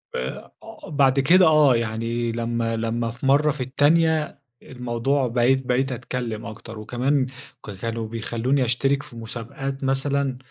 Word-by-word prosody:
آآ، 65 +1 -5
آه، - - -11
بعد 140 -2 +3
كده 180 +7 +6
آه 150 -5 +5
يعني 115 +1 -2
لمّا 115 0 -1
لمّا 115 +1 -1
في 120 +3 -8
مرة 145 +3 +4
في 145 -2 -6
التانية 155 +4 +2 0.2
الموضوع 125 +2 -1
بقيت 125 +3 +2
بقيت 130 +2 +1
أتكلم 120 -2 -4
أكتر، 115 0 -9
وكمان 130 +5 0 0.4
ك 105 - -6
كانوا 115 +3 -4
بيخلّوني 120 +4 -1
أشترك 135 +4 +1
في - - -13
مسابقات 120 +4 -6
مثلًا، 135 0 0
125 Hz, 145 wpm, -23 LUFS, 115-135 Hz, 0.4 s, كده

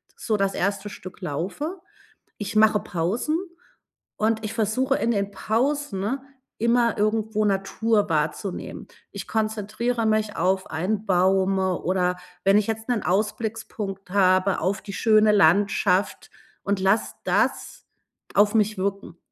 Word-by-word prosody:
so 215 -2 -1
das 195 0 0
1. 200 +2 -1
Stück 185 -2 -10
laufe. 195 - -4 0.6
Ich 210 +1 -3
mache 215 -1 +5
Pausen, 190 - -1 0.8
und 220 +1 +1
ich 215 - -6
versuche 250 +5 +1
in 235 - 0
den 200 -2 0
Pausen 230 +1 -1 0.4
immer 235 0 +2
irgendwo 215 0 0
Natur 205 +2 +1
wahrzunehmen. 160 +4 -3 0.2
Ich - - -8
konzentriere 220 +2 -1
mich 215 -1 0
auf 190 +2 0
einen 195 +7 -2
Baum, 190 +1 +2
oder 180 -1 0 0.3
wenn 195 +1 +4
ich 210 - +3
jetzt 220 +1 -4
'nen 240 -4 0
Ausblickspunkt 210 -1 -3
habe 185 0 +3
auf 190 +4 -1
die 200 - -8
schöne 215 -1 +4
Landschaft 195 +1 +2 0.3
und 200 -1 -1
lasse 195 +4 +2
das - - 0 0.5
auf 205 +2 +4
mich 210 -2 +2
wirken 195 -3 -3
205 Hz, 125 wpm, -24 LUFS, 190-220 Hz, 0.8 s, mache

